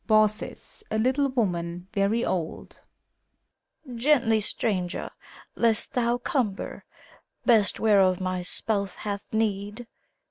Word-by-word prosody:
BAUCIS 215 - +1
(a - - -1
little 265 +5 +2
woman, 175 -7 -1
very 210 +3 +1
old). 170 -4 -3 1.1
Gently, 235 -3 +3
stranger! 190 -4 -2 0.4
lest 230 -2 +2
thou 240 -1 +2
cumber 240 -7 -2 0.6
Best, 220 -5 +4
whereof 195 -4 +4
my 185 -1 -2
spouse 200 +1 -2
hath 200 -1 -5
need! 210 +1 -1
215 Hz, 100 wpm, -26 LUFS, 195-235 Hz, 1.1 s, Best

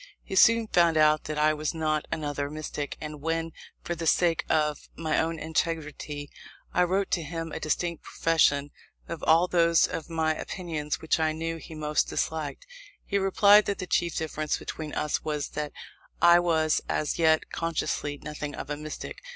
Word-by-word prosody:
He - - -8
soon 230 +4 +6
found 170 -5 +3
out 155 0 +4
that 155 0 -4
I 155 +1 +4
was 155 +2 -3
not 155 -1 -1
"another 145 -2 -2
mystic," 150 -1 -5
and 150 -1 -7
when 165 +1 -1 0.3
for 175 - -2
the 165 -1 -4
sake 170 0 +3
of 150 -2 0
my 160 -1 0
own 165 0 -1
integrity 155 -2 -3 0.4
I - - +3
wrote 190 +2 0
to 175 - +1
him 165 +1 -5
a - - -4
distinct 170 +2 -1
profession 145 -3 +2 0.4
of 165 - -6
all 165 +3 +5
those 170 -2 +4
of 160 - -5
my 160 -1 +1
opinions 155 -3 -4
which 160 - +1
I 155 -1 +1
knew 165 +1 -3
he 160 0 -10
most 150 -1 0
disliked, 160 - -3 0.4
he 200 - 0
replied 200 +2 +6
that 200 - -1
the 185 - -4
chief 170 -1 0
difference 155 -1 -2
between 155 -2 -6
us 150 - -1
was 150 -2 -2
that 150 -1 -4 0.5
I 175 0 +7
"was 160 -3 +2
as 150 - -1
yet 160 -1 +3
consciously 155 -3 -2
nothing 150 -1 -5
of - - -6
a 145 - -2
mystic." 155 - -7
160 Hz, 175 wpm, -27 LUFS, 150-170 Hz, 0.5 s, I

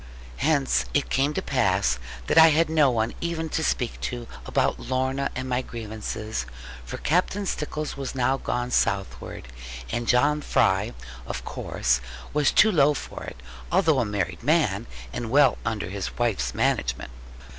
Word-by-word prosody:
Hence 145 -3 +2
it 145 - +1
came 140 +3 +1
to - - -1
pass - - +1 0.3
that - - 0
I 160 0 +10
had 160 +1 +3
no 155 -4 +5
one 115 -2 0
even 165 -1 -2
to 160 - -1
speak 125 -5 -1
to, 120 -1 -4 0.2
about - - +1
Lorna 130 +1 -1
and 130 +1 -3
my 125 0 0
grievances; 110 - -5 0.4
for - - -6
Captain 185 +5 0
Stickles 150 -3 -3
was 135 -1 -5
now 130 +1 +2
gone 125 -1 -2
southward; 70 - -1 0.4
and 120 0 -2
John 145 +4 +3
Fry, 100 -3 +2 0.3
of - - -5
course, 60 0 0 0.3
was 150 -1 +3
too 215 - +6
low 150 -4 +4
for - - -7
it, - - -8 0.3
although 160 -4 +3
a 120 - +1
married 105 -3 -2
man, 120 -7 +2 0.3
and 120 -2 -4
well 140 +1 +4
under 110 -4 -2
his 100 -1 -4
wife's 120 -5 0
management. 60 0 0
130 Hz, 155 wpm, -25 LUFS, 110-150 Hz, 0.4 s, I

